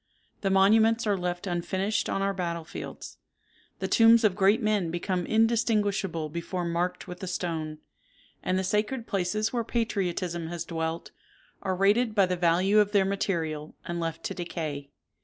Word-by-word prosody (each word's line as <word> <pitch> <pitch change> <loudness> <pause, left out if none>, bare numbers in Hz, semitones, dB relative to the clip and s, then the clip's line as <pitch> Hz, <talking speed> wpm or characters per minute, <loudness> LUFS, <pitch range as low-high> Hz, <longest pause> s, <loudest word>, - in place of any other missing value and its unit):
The 195 - +1
monuments 220 +4 +4
are 205 -2 +2
left 180 0 -3
unfinished 190 +3 -1
on 195 - 0
our 195 0 +1
battle 170 -3 -3
fields; 160 - -8 0.6
the - - -3
tombs 230 0 +6
of 205 -4 +3
great 200 +3 +4
men 210 -6 +1
become 175 +1 -2
indistinguishable 215 -7 +1
before 170 +3 -4
marked 170 +1 -2
with 180 0 -8
a 190 - -4
stone; 160 -4 -3 0.6
and 185 - 0
the 190 - 0
sacred 210 +5 -1
places 205 +3 -1
where 235 -2 0
patriotism 185 -7 -2
has 170 0 -5
dwelt, 165 0 -3 0.5
are 190 -1 -1
rated 210 +4 +2
by 200 -3 +5
the 180 0 -1
value 180 +4 +3
of 210 0 +2
their 200 -2 +4
material, 165 -6 -2
and 175 0 -3
left 165 -1 -4
to - - -3
decay. 155 -5 -5
185 Hz, 160 wpm, -27 LUFS, 170-210 Hz, 0.6 s, tombs